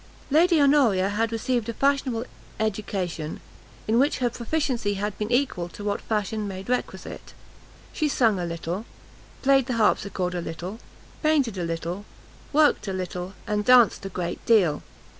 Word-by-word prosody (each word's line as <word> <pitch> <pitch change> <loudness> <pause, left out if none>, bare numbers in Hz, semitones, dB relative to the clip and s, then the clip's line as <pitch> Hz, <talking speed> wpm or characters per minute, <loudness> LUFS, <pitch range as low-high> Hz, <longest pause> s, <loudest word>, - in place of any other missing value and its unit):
Lady 330 +2 +5
Honoria 260 -10 +4
had 220 +2 0
received 235 0 -1
a 230 - -4
fashionable 275 -4 +1 0.3
education, 195 -7 -2 0.5
in 225 +2 +3
which 280 +3 +3
her 245 -2 0
proficiency 240 -5 -1
had 205 +1 -3
been 210 +2 -2
equal 245 -9 +1
to 205 - -10
what 205 0 -1
fashion 215 0 -2
made 190 0 -7
requisite; 250 - -4 0.6
she 305 -2 0
sung 225 -8 +2
a 175 - -2
little; 170 +4 -4 0.6
played 270 -2 +4
the 255 - -1
harpsichord 195 -4 +1
a 175 - -2
little, 175 +6 -6 0.4
painted 290 -8 +2
a 180 - -3
little, 170 +3 -3 0.5
worked 300 -7 +3
a 195 - -2
little, 185 0 -4
and 210 0 -1
danced 245 -3 +5
a 195 - -4
great 175 -2 -4
deal. 185 -10 +4
215 Hz, 155 wpm, -25 LUFS, 185-250 Hz, 0.6 s, Lady